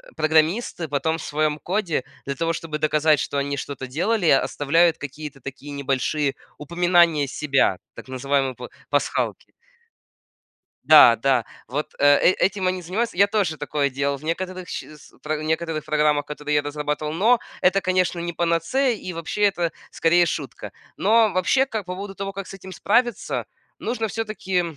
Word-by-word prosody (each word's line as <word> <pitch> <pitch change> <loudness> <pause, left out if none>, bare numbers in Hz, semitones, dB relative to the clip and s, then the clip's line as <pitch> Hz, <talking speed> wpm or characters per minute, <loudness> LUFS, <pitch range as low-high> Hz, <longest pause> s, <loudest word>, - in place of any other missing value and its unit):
программисты 160 +3 +1
потом 155 +3 -1
в 165 - -8
своем 150 0 -1
коде, 180 -7 -1 0.2
для 140 0 -3
того, 165 +3 -1
чтобы 160 -2 -4
доказать, 155 0 +3
что 140 - -3
они 140 0 -1
что-то 135 -2 -6
делали, 180 - 0
оставляют 165 +5 +3
какие-то 140 0 -8
такие 135 +3 -8
небольшие 140 +1 -1 0.2
упоминания 170 -1 +3
себя, 135 -8 +1 0.2
так - - -11
называемые 135 +1 0
па - - -8 0.2
пасхалки. - - -1 1.3
Да, 150 -7 +8
да, 125 -1 +1 0.2
вот, 145 +4 -4
э, - - -1
э, - - +5
этим 190 -1 +1
они 185 0 -1
занимаются. 195 +5 -2
Я 200 +2 +6
тоже 200 -7 0
такое 145 -1 -1
делал 140 +1 -1
в 140 - -17
некоторых 185 +2 -4
сч - - -4
с 150 -1 -15
про 155 0 -2
в 155 - -6
некоторых 160 -1 -2
программах, 150 -1 +1
которые 150 0 -3
я 145 - +4
разрабатывал, 150 +1 -3
но 225 +8 +3 0.2
это, 190 +2 +3
конечно, 185 -1 +1
не 170 0 -3
панацея, 170 - +1
и 185 - -7
вообще, 165 +5 -5
это 175 -5 +2 0.2
скорее 175 +1 +3
шутка. 150 -4 -5 0.2
Но 220 +2 +4
вообще, 185 +9 +2
как 220 -7 -4
по 180 - -5
поводу 195 0 -7
того, 195 0 -4
как 195 0 -7
с - - -9
этим 190 -1 -10
справиться, 235 +5 0 0.3
нужно 225 -1 -2
всё-таки, 205 -4 -2
160 Hz, 165 wpm, -23 LUFS, 145-185 Hz, 1.3 s, Да